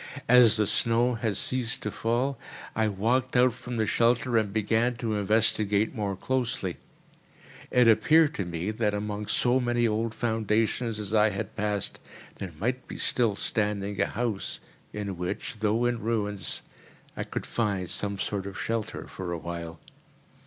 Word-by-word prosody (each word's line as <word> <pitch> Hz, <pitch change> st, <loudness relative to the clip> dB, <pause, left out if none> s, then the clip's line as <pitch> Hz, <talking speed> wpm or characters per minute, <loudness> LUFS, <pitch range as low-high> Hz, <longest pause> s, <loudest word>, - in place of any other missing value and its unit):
As 120 Hz, -2 st, +7 dB
the 105 Hz, -, +2 dB
snow 115 Hz, +4 st, +2 dB
had 110 Hz, -3 st, -1 dB
ceased 125 Hz, -3 st, +1 dB
to 105 Hz, -, -2 dB
fall, 120 Hz, +5 st, -1 dB, 0.4 s
I 110 Hz, 0 st, +2 dB
walked 120 Hz, +6 st, 0 dB
out 125 Hz, -1 st, +5 dB
from 125 Hz, 0 st, -6 dB
the 110 Hz, -, +2 dB
shelter 120 Hz, +3 st, +2 dB
and 110 Hz, -3 st, +2 dB
began 110 Hz, +3 st, +1 dB
to 115 Hz, -1 st, -2 dB
investigate 105 Hz, 0 st, +2 dB
more 100 Hz, -3 st, -2 dB
closely. 120 Hz, -5 st, -1 dB, 0.9 s
It 125 Hz, -1 st, +4 dB
appeared 150 Hz, +8 st, +5 dB
to 95 Hz, -, -3 dB
me 85 Hz, +4 st, -3 dB
that, 105 Hz, -2 st, 0 dB
amongst 105 Hz, 0 st, -2 dB
so 125 Hz, +1 st, +3 dB
many 120 Hz, -1 st, +1 dB
old 110 Hz, +1 st, -1 dB
foundations 110 Hz, 0 st, 0 dB
as 105 Hz, 0 st, -5 dB
I 110 Hz, 0 st, +5 dB
had 100 Hz, -1 st, -5 dB
passed, 105 Hz, -2 st, -2 dB, 0.4 s
there 95 Hz, -3 st, -6 dB
might 125 Hz, +7 st, -2 dB
be -, -, -7 dB
still 115 Hz, -5 st, +2 dB
standing 105 Hz, -2 st, -1 dB
a -, -, +2 dB
house 115 Hz, -5 st, -3 dB, 0.3 s
in 100 Hz, -3 st, -4 dB
which, 90 Hz, +5 st, -4 dB
though 110 Hz, +3 st, +1 dB
in 120 Hz, -1 st, 0 dB
ruins, 105 Hz, -3 st, -2 dB, 0.5 s
I -, -, -3 dB
could -, -, -5 dB
find 100 Hz, -5 st, -1 dB
some 100 Hz, +3 st, -3 dB
sort 100 Hz, 0 st, -3 dB
of 95 Hz, -, -7 dB
shelter 115 Hz, -2 st, -3 dB
for 95 Hz, -2 st, -6 dB
a 85 Hz, -, -2 dB
while. 85 Hz, 0 st, -6 dB
110 Hz, 160 wpm, -27 LUFS, 100-120 Hz, 0.9 s, As